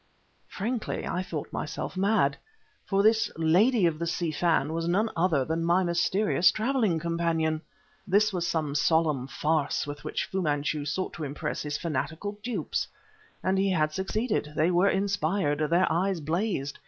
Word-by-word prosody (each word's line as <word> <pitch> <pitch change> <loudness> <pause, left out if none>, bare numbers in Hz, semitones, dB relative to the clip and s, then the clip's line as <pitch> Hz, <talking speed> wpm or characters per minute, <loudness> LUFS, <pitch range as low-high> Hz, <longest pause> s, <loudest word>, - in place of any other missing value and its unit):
Frankly, 225 +3 -3
I 180 - -2
thought 160 -5 -6
myself 155 - -4
mad; 185 -7 +2 0.5
for 195 0 +2
this 220 +1 +3
"lady 185 +7 +4
of 160 -2 +1
the 170 - -2
Si 170 -1 -1
Fan" 155 -1 +1
was 165 0 -2
none 205 +6 +1
other 165 -6 +2
than 165 +3 -1
my 175 +3 +3
mysterious 175 +1 +3
traveling 220 -5 +1
companion! 165 -1 0 0.5
This 205 +2 +3
was 175 -2 -1
some 155 -4 -1
solemn 150 -3 +2
farce 150 +1 0
with 145 0 -7
which - - -2
Fu 190 - -2
Manchu 145 -1 -1
sought 185 +6 -2
to 160 - -6
impress 140 0 -3
his 150 0 -3
fanatical 170 +6 -3
dupes. 215 -8 -2 0.6
And 190 +1 +1
he 195 0 +2
had 155 -4 +1
succeeded; 190 -3 -1
they 160 +3 +2
were 180 +3 +4
inspired, 190 -5 0
their 175 +2 +4
eyes 185 +1 +1
blazed. 160 -2 -2
170 Hz, 160 wpm, -27 LUFS, 155-195 Hz, 0.6 s, lady